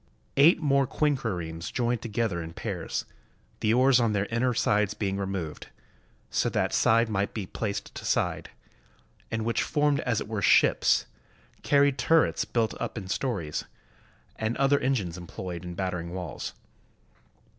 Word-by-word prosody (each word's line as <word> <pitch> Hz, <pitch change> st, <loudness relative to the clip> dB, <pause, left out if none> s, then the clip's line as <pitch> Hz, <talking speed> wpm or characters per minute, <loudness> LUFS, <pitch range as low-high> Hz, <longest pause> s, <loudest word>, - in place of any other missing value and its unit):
Eight 155 Hz, +6 st, +6 dB
more 140 Hz, -3 st, +2 dB
quinquiremes 95 Hz, -, -2 dB
joined 120 Hz, -1 st, 0 dB
together 110 Hz, -6 st, -1 dB
in 80 Hz, 0 st, -7 dB
pairs, -, -, -4 dB, 0.5 s
the 110 Hz, -, +2 dB
oars 130 Hz, +2 st, +5 dB
on 115 Hz, -3 st, +2 dB
their 100 Hz, -1 st, +1 dB
inner 120 Hz, +2 st, +2 dB
sides 105 Hz, -1 st, +2 dB
being 100 Hz, -2 st, -2 dB
removed, 95 Hz, -5 st, -4 dB, 0.6 s
so -, -, +1 dB
that -, -, 0 dB
side 115 Hz, +1 st, +4 dB
might 100 Hz, -2 st, -1 dB
be 105 Hz, -4 st, -3 dB
placed 100 Hz, +2 st, -4 dB
to -, -, -8 dB
side, -, -, 0 dB, 0.8 s
and 110 Hz, 0 st, -2 dB
which 115 Hz, -, +1 dB
formed 145 Hz, -1 st, +1 dB
as 115 Hz, -3 st, 0 dB
it -, -, -5 dB
were 110 Hz, -2 st, -3 dB
ships, -, -, +4 dB, 0.6 s
carried 140 Hz, -1 st, +3 dB
tur 165 Hz, -1 st, +5 dB
rets -, -, -1 dB
built 115 Hz, -2 st, 0 dB
up -, -, -3 dB
in 95 Hz, -4 st, -5 dB
stories, 100 Hz, -, -2 dB, 0.7 s
and 110 Hz, +1 st, -2 dB
other 135 Hz, +1 st, +3 dB
engines 100 Hz, -10 st, -1 dB
employed 85 Hz, 0 st, -7 dB
in 90 Hz, -1 st, -6 dB
battering 90 Hz, -2 st, -3 dB
walls. 90 Hz, -1 st, -5 dB
110 Hz, 150 wpm, -27 LUFS, 95-125 Hz, 0.8 s, Eight